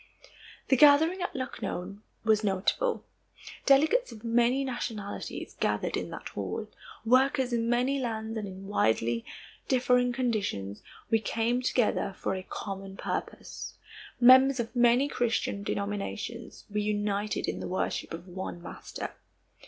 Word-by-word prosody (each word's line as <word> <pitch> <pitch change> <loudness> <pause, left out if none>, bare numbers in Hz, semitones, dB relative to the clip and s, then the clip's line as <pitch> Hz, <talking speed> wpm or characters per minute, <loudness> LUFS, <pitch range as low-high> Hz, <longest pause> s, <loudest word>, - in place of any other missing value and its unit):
The 265 - +6
gathering 310 +6 +6
at 355 - -3
Lucknow 200 -7 -4 0.3
was 220 -1 +3
notable. 205 - 0 0.6
Delegates 315 - +4
of 215 0 -11
many 240 +3 +3
nationalities 225 -5 -5
gathered - - 0
in - - -3
that - - -7
hall. - - -4 0.4
Workers 260 +1 +3
in 230 0 +1
many 250 +3 +2
lands 225 -3 -3
and 215 -2 -3
in 190 0 -9
widely 115 - +1 0.4
differing 250 -1 +3
conditions, 210 - -2 0.3
we 225 - +5
came 230 +3 0
together 240 -6 +1
for - - -1
a 190 - -3
common 195 0 -6
purpose. - - -5 0.4
Members 260 +2 +7
of 235 +2 -3
many 245 +3 +5
Christian 230 -6 -1
denominations, 205 +3 -4
we 210 0 -1
united 205 0 -1
in - - -2
the - - -4
worship 185 - -2
of 170 +3 -7
one 185 -1 -6
Master. 170 - -7
230 Hz, 130 wpm, -29 LUFS, 200-255 Hz, 0.6 s, Members